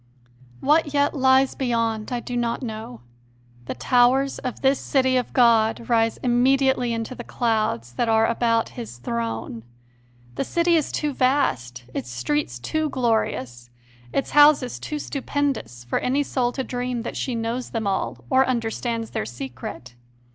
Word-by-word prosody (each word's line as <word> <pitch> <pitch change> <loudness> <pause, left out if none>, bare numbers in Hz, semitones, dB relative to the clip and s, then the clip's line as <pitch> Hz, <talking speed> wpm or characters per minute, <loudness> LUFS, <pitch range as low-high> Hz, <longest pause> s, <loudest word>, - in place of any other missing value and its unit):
What 295 0 +2
yet 285 0 +3
lies 265 -1 +4
beyond 230 -4 -1
I 245 -1 -2
do 245 - -5
not 240 +1 -1
know: 215 - -6 0.6
the - - -5
towers 250 - +3
of 255 -3 -5
this 270 +1 +3
City 260 -2 +1
of 250 -1 0
God 230 -2 +3
rise 225 -1 +2
immediately 255 0 +3
into 230 +1 -3
the 245 - -8
clouds 215 - -1
that 235 - 0
are 225 0 +4
about 230 0 +1
His 230 - -8
Throne; 115 -1 -4 0.7
the - - -2
City 340 +4 +2
is 310 -3 +1
too 300 -2 -1
vast, 130 - 0
its 120 - -4
streets 120 +1 -2
too 310 - -2
glorious, 220 - -1 0.4
its 275 - -1
houses 290 -4 +5
too 300 - -4
stupendous 275 - -3
for 120 - -1
any 275 +3 +1
soul 250 -3 0
to 265 - -2
dream 245 -2 -3
that - - -5
she 255 - -2
knows 230 +2 -3
them 225 -2 -3
all 195 -1 -2
or 260 0 +4
understands 230 -1 -2
their 105 - -3
secret. 125 0 -7
240 Hz, 155 wpm, -23 LUFS, 215-265 Hz, 0.7 s, houses